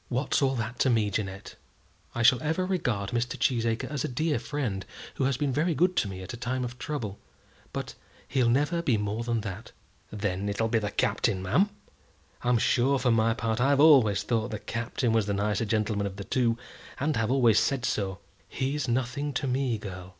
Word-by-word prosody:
"What's 130 +4 0
all 135 -1 +2
that 115 0 -4
to 130 - +3
me, 110 -4 +2
Jeannette? 95 -1 -4 0.6
I 120 - 0
shall 125 +2 +6
ever 160 +4 0
regard 120 - -1
Mr. 120 +3 -1
Cheesacre 115 -3 0
as 140 -3 -3
a - - 0
dear 150 +4 0
friend 120 -10 -3 0.3
who 135 - -1
has 135 -1 +1
been 140 -2 0
very 160 +4 +1
good 180 +4 +2
to - - +2
me 95 -1 -6
at 95 - -7
a - - -6
time 125 +2 -2
of 120 0 -8
trouble; 125 -9 -4 0.5
but - - -5 0.3
he'll 130 -4 +2
never 145 +7 +2
be 130 -9 +2
more 105 +2 -2
than 115 -1 -1
that." 100 +1 -7 0.4
"Then 100 -1 -2
it'll 110 +3 0
be 115 - +2
the 105 -1 -2
Captain, 95 -2 0
ma'am? 185 - +3 0.7
I'm 125 0 +2
sure, 130 +4 +2
for 125 -2 +2
my 115 0 +3
part, 115 -1 -1
I've 140 +2 +3
always 130 -10 +6
thought 115 -1 0
the 110 - -3
Captain 120 +2 -2
was 110 -2 +2
the 100 - 0
nicer 105 +2 0
gentleman 105 -2 0
of 95 - -7
the 100 - -6
two, 115 +2 +1 0.4
and 145 +2 0
have 115 -1 0
always 120 -5 +4
said 135 -3 0
so." 100 -6 -1 0.3
"He's 135 +2 -2
nothing 130 +4 -1
to 135 - -1
me, 130 -2 0
girl." 95 -3 -8
120 Hz, 200 wpm, -28 LUFS, 105-135 Hz, 0.7 s, shall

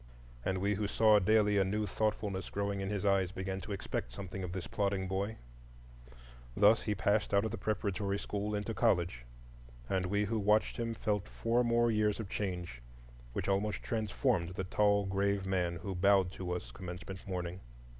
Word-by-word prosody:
And 95 - 0
we 100 +2 +1
who 105 +1 -1
saw 110 0 +5
daily 105 0 +4
a - - +5
new 105 +3 -1
thoughtfulness 105 -2 -1
growing 100 -1 -2
in 95 - -2
his 105 -1 -2
eyes 95 -2 +3
began 95 0 -4
to 105 - -8
expect 95 -10 -3
something 95 +7 -6
of 90 - -4
this 90 -2 -4
plodding 100 0 -1
boy. 100 +3 -2 1.2
Thus 105 +3 +6
he 105 - -1
passed 100 +1 +1
out 100 +2 +3
of 110 - -2
the 115 - -5
preparatory 100 -1 -1
school 105 +1 -3
into 105 +2 -2
college, 85 - +1 0.6
and 95 +2 0
we 100 +2 +1
who 110 +2 -1
watched 105 +1 +2
him 115 -1 -2
felt 105 -3 -1
four 120 +2 +1
more 120 0 +3
years 105 -1 +1
of 105 -4 -5
change, 90 - -4 0.5
which - - -3
almost 100 +2 0
transformed 110 -4 0
the 95 - -2
tall, 100 +2 +2
grave 100 0 0
man 90 -2 0
who 95 +4 -5
bowed 95 0 +4
to 90 -2 -5
us 90 - -4
commencement 90 +1 -8
morning. 90 -1 -3
100 Hz, 180 wpm, -33 LUFS, 95-105 Hz, 1.2 s, Thus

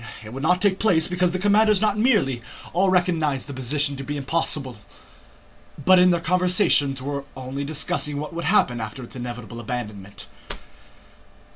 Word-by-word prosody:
It 110 +2 -10
would 135 - -6
not 180 +5 +2
take 195 -2 +2
place 170 -7 +2
because 180 0 0
the 185 - -2
commanders 205 +1 +3
not 210 -1 +1
merely 210 - +2 0.3
all 190 +3 +2
recognized 165 -7 +1
the 140 - -7
position 140 +3 0
to 135 - -6
be 145 +2 -4
impossible, 140 -4 -1 1.1
but 185 -1 +7
in 180 0 +6
their 175 -1 +2
conversations 180 -6 +2
were 140 0 -3
only 130 +2 -5
discussing 150 0 -2
what 150 +3 -6
would 170 -1 -4
happen 130 - +2
after 110 +4 -6
its 120 - -11
inevitable 120 -2 -7
abandonment. 105 -4 -6
150 Hz, 160 wpm, -23 LUFS, 130-180 Hz, 1.1 s, but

